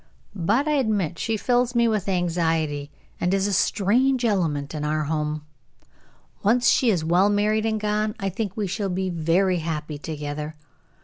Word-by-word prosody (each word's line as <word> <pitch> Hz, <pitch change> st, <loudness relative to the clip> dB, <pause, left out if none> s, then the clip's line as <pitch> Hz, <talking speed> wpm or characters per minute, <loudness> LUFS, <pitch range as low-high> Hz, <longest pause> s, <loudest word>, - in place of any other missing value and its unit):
But 210 Hz, -, +1 dB
I -, -, +2 dB
admit 205 Hz, -, 0 dB
she 225 Hz, -1 st, -1 dB
fills 245 Hz, +2 st, +1 dB
me 235 Hz, 0 st, +4 dB
with 210 Hz, -3 st, 0 dB
anxiety, 165 Hz, -5 st, 0 dB, 0.3 s
and 180 Hz, -, 0 dB
is 195 Hz, 0 st, +1 dB
a 205 Hz, -, 0 dB
strange 240 Hz, +7 st, +2 dB
element 160 Hz, -10 st, 0 dB
in 150 Hz, -1 st, -4 dB
our 155 Hz, +1 st, 0 dB
home. 150 Hz, 0 st, -2 dB, 1.0 s
Once 240 Hz, +4 st, +3 dB
she 250 Hz, -, +4 dB
is 175 Hz, -7 st, +1 dB
well 180 Hz, +5 st, +4 dB
married 215 Hz, +2 st, +1 dB
and 220 Hz, -1 st, 0 dB
gone, 210 Hz, 0 st, -1 dB
I 195 Hz, -, -1 dB
think 195 Hz, +1 st, -4 dB
we 210 Hz, -, 0 dB
shall 195 Hz, +1 st, -2 dB
be 185 Hz, 0 st, -1 dB
very 175 Hz, +3 st, +1 dB
happy 155 Hz, -2 st, -4 dB
together. 150 Hz, 0 st, -5 dB
190 Hz, 170 wpm, -24 LUFS, 160-215 Hz, 1.0 s, me